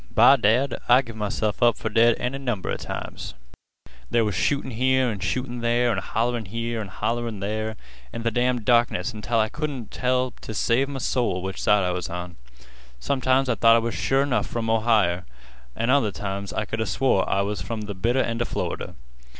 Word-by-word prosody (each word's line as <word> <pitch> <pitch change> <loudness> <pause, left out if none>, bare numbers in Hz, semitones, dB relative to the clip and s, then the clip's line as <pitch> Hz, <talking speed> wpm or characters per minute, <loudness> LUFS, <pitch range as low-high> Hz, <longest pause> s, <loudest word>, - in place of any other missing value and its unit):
By 135 - +8
dad, 120 +3 +2
I 125 +2 +6
give 115 -2 -10
myself 105 +1 -2
up 120 -2 +4
fer - - -4
dead 115 +2 +4
any 125 +3 -2
number 120 -8 -2
'a - - -1
times. - - -6 0.7
There 115 -2 +2
was 105 - -1
shootin' 140 - 0
here 130 +2 +2
an' 105 - -5
shootin' 120 +5 -2
there, 120 +1 +2
an' 100 - 0
hollerin' 115 +3 -1
here 115 +2 -3
an' 105 - -6
hollerin' 115 +3 -3
there, 110 +2 -3 0.4
in 115 - -6
th' 115 -1 0
damn' 125 0 +1
darkness, 115 -3 +2
until 110 +2 -2
I 110 -1 +3
couldn't 135 -3 -5
tell 125 0 0
t' 110 - -9
save 125 +5 +1
m' 140 - -5
soul 120 -8 -1
which 95 0 -5
side 105 -1 +3
I 90 - 0
was 90 0 -3
on. 90 0 -6 0.6
Sometimes 130 - +1
I 125 - +2
thought 115 0 +5
I 115 0 +1
was 115 - -2
sure 135 +1 +1
'nough 135 -3 0
from 115 -1 -2
Ohier, 110 -6 +2 0.5
an' 115 +2 0
other 130 -7 +3
times 100 0 -5
I 110 - -2
could 115 +1 -3
'a 110 - -1
swore 125 -8 +1
I 100 - +2
was 105 +1 -3
from 115 -2 -4
th' 100 -3 -7
bitter 120 +4 +2
end 115 0 -2
of 120 - 0
Florida. - - -4
115 Hz, 205 wpm, -24 LUFS, 105-125 Hz, 0.7 s, By